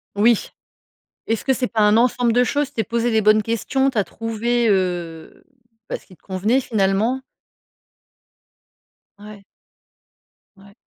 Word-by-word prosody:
Oui. 220 +2 +2 0.8
Est-ce 225 -1 -2
que 270 - +2
c'est 255 -1 -1
pas 225 - -1
un 210 +1 +4
ensemble 245 -1 +2
de 245 - +3
choses? 285 +3 0
Tu 285 - -26
t'es 225 - 0
posé 235 +1 -1
les 220 -1 +2
bonnes 215 +1 +4
questions, 255 +5 0
tu 240 - -3
as 200 - +2
trouvé, 230 +2 -1
heu, 175 -4 -3 0.5
bah - - -2
ce - - -24
qui 185 - -17
te - - -41
convenait 205 +7 0
finalement? 220 +3 0 2.0
Ouais. 205 -1 -12 1.1
Ouais. 200 +1 -18
225 Hz, 150 wpm, -21 LUFS, 200-240 Hz, 2.0 s, un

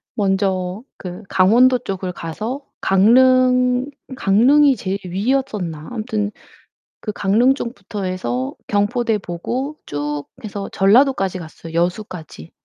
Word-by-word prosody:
먼저 190 0 0
그 180 +2 -8
강원도 240 +7 +5
쪽을 190 -5 -4
가서 215 - -5 0.2
강릉 250 +4 +4 0.3
강릉이 265 +7 +4
제일 195 -4 -3
위였었나? 195 - -2
아무튼 215 -3 -2 0.7
그 215 - -3
강릉 220 +7 +3
쪽부터 210 -6 -6
해서 130 -9 -2
경포대 220 +2 +1
보고 240 - -4
쭉 145 0 -3 0.2
해서 205 -2 -5
전라도까지 195 -2 +3
갔어요, 165 0 -10
여수까지. 170 - -3
200 Hz, 245 characters per minute, -20 LUFS, 180-250 Hz, 0.7 s, 강원도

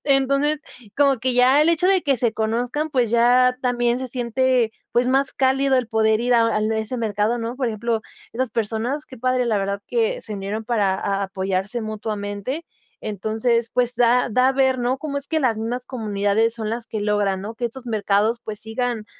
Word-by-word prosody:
Entonces, 275 +2 +2 0.4
como 275 -2 +3
que 255 +2 0
ya 255 +3 +5
el 305 - +4
hecho 335 +2 +2
de 380 -2 +3
que 275 -2 +2
se 235 -2 0
conozcan, 240 +7 -1
pues, 250 -5 +1
ya 250 +2 +4
también 240 -1 +1
se 260 - -4
siente, 250 -1 +1 0.2
pues, 245 +1 +2
más 270 +1 +2
cálido 270 0 +2
el 250 -3 0
poder 220 -1 +2
ir 245 +1 +1
a 230 -1 +4
al 215 0 +1
n 220 0 0
ese 220 +4 -4
mercado, 220 0 0
¿no? 230 +2 -4
Por 260 -1 -1
ejemplo, 225 +1 -1 0.3
esas 255 +1 -2
personas, 230 +7 -2
qué 260 - -13
padre, 255 +1 +1
la 220 -3 +1
verdad, 200 0 -2
que 480 +1 0
se 215 - -6
unieron 205 +3 -4
para 210 -5 +1
a 195 +1 -1
apoyarse 190 +3 -2
mutuamente. 215 +5 -4 0.4
Entonces, 220 +3 0
pues, 250 -1 +1
da 245 +1 +3
da 255 +3 +3
a - - +2
ver, 265 -1 +2
¿no?, 245 +2 0
cómo 285 0 -4
es 280 - -2
que 315 +1 0
las 235 -6 +1
mismas 245 +3 -3
comunidades 215 -1 0
son 220 -2 -4
las 230 0 -4
que 215 - -4
logran, 205 -2 0
¿no?, 210 +4 -6
que 245 - -4
estos 240 +2 -5
mercados, 215 0 +1
pues, 210 -1 -6
sigan, 225 0 -3
235 Hz, 205 wpm, -22 LUFS, 215-260 Hz, 0.4 s, ya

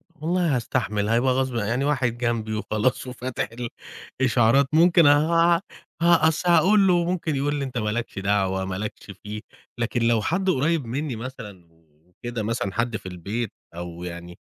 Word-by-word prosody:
والله 165 0 0
هأستحمل 105 -4 -1
هيبقى 120 +3 +3
غصب 130 -1 -1
يعني 115 +4 0
واحد 125 -5 0
جنبي 115 -3 -1
وخلاص 110 +4 -1
وفاتح 125 0 -4 0.7
الإشعارات، 120 +2 +4
ممكن 170 0 +6
ه 165 +4 +4 0.4
أصل 170 0 +3
هأقول 190 +4 +5
له، 175 -1 +3
ممكن 170 -3 -1
يقول 145 +2 0
لي: 140 -1 -2
"أنت 130 -1 -6
ما 105 -2 -1
لكش 115 -2 -3
دعوة، 95 -1 0
ما 95 -1 -4
لكش 105 +1 -6
فيه"، 105 +1 -6 0.4
لكن 120 +1 -1
لو 115 -2 +3
حد 185 - 0
قريّب 160 -1 +1
مني 135 +3 -3
مثلًا 110 -7 -9 0.4
وكده 120 +5 -6
مثلًا 105 -3 -2
حد 120 -1 -1
في - - -19
البيت 100 +5 -4 0.2
أو 85 0 -7
يعني 85 0 -8
120 Hz, 155 wpm, -24 LUFS, 105-150 Hz, 0.7 s, ممكن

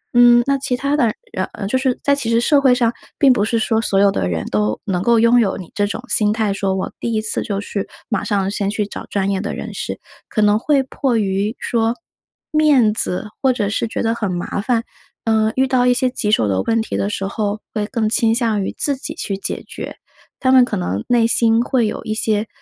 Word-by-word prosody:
嗯， 240 0 +7
那 275 0 +1
其 255 -2 -1
他 280 +3 0
的， 245 -7 +2 0.2
然 185 - -2
呃， 205 - -6
就 215 - -1
是 260 -1 0
在 280 - +3
其 275 -5 -3
实 230 0 +3
社 280 +4 +3
会 265 -2 +5
上 235 -2 +1 0.2
并 275 -4 +5
不 205 - 0
是 230 +2 0
说 225 0 +1
所 195 -3 +1
有 200 0 +5
的 90 - -1
人 80 -2 -2
都 105 0 0
能 185 -3 -1
够 235 +3 +3
拥 230 +2 +5
有 205 -5 +1
你 180 - -9
这 205 - +1
种 205 - -5
心 210 -3 +3
态， 215 -2 0
说 195 -1 -1
我 190 - -4
第 235 - -2
1 215 - +1
次 215 - -2
就 200 -2 -3
去 200 -1 -4 0.2
马 210 -3 -1
上 200 -2 0
先 200 -1 -1
去 210 0 -1
找 205 - -8
专 195 -1 -1
业 190 -1 -1
的 205 - -4
人 - - -6
士。 - - -5 0.3
可 215 - -1
能 210 +1 +4
会 280 +2 +2
迫 260 -2 -1
于 200 +1 -1
说， 230 0 0 0.6
面 290 -8 +4
子 195 -2 -1
或 265 - +4
者 215 -5 -1
是 225 +2 -1
觉 - - -3
得 225 0 +1
很 210 -5 -2
麻 175 +3 -3
烦， 230 +1 0 0.4
呃， 220 -1 +2
遇 265 - +3
到 250 -1 +2
一 250 - +5
些 255 +1 +2
棘 215 -4 -1
手 110 - +3
的 95 -1 0
问 230 - 0
题 220 - -4
的 200 - -1
时 195 -2 -3
候， 205 +1 -2
会 210 -2 -1
更 230 -3 -1
倾 225 0 +2
向 225 -4 +1
于 - - -3
自 285 - +1
己 265 - -6
去 195 - -3
解 195 - -3
决。 - - -7 0.4
他 260 - +2
们 260 -1 +7
可 245 - -2
能 90 +3 -2
内 240 -2 +3
心 230 0 +3
会 245 -3 +1
有 - - -5
一 215 - -3
些 215 0 0
220 Hz, 260 characters per minute, -19 LUFS, 200-245 Hz, 0.6 s, 嗯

